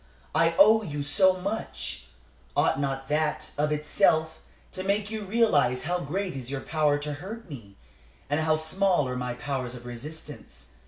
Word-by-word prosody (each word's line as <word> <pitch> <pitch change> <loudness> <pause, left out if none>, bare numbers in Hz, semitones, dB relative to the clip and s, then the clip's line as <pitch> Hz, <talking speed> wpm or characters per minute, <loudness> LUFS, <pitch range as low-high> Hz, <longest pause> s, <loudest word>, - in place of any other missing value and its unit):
I 165 0 +3
owe 220 +3 +7
you 145 -8 -4
so 185 +5 +4
much. 195 - -4 0.5
Ought 135 - +3
not 135 -1 -2
that, 150 0 0
of 150 +1 0
itself, 155 +1 +2 0.3
to 185 - -4
make 200 +2 0
you 215 -2 -4
realize 170 - +2
how 180 +3 0
great 180 +3 -3
is 130 -2 -6
your 135 -1 -3
power 150 -1 +1
to 145 0 -4
hurt 205 +10 -8
me, 110 - -10 0.5
and 145 +2 0
how 155 0 +3
small 160 0 +1
are 125 - -3
my 125 -1 -3
powers 125 -2 -3
of 120 0 -10
resistance? 120 - -9
150 Hz, 165 wpm, -27 LUFS, 135-185 Hz, 0.5 s, owe